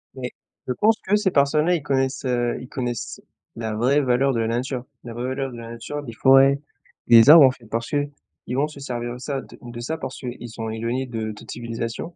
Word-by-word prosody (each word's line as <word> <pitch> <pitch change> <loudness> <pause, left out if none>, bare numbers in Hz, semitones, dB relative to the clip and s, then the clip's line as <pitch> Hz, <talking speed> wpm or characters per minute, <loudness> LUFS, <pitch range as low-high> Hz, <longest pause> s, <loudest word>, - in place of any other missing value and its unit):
Mais 125 -1 -5 0.4
je 125 - 0
pense 220 - +3
que 200 - +1
ces 210 -2 +1
personnes 140 +1 +3
là, 180 - +4
ils 165 - -2
connaissent, 135 -1 -1
heu, 120 -1 0
ils 125 - -9
connaissent 120 -3 -4 0.3
la 110 -1 -4
vraie 130 +7 +2
valeur 135 +1 +2
de 115 - -1
la 115 - 0
nature. 125 +2 -2 0.2
La 120 - -8
vraie 120 +2 -4
valeur 135 0 -3
de 120 - -9
la 115 0 -8
nature, 130 +6 -6
des 120 -5 -8
forêts, 135 +3 +5 0.5
des 115 +2 +8
arbres, 155 -2 +10
en 130 - +5
fait. 125 -2 -16
Parce 115 +1 -3
que, 145 -1 0 0.4
ils 125 - -1
vont 140 +3 +2
se 150 -2 -12
servir 120 -3 -4
de - - -8
ça 135 +1 -4
de - - -15
de 120 -1 -8
ça 160 +7 -3
parce 135 - -6
qu'ils 120 -2 -7
sont 110 0 -5
éloignés 115 +4 -2
de 110 -3 -4
toute 105 - -11
civilisation 115 +7 -5
125 Hz, 235 wpm, -23 LUFS, 115-140 Hz, 0.5 s, arbres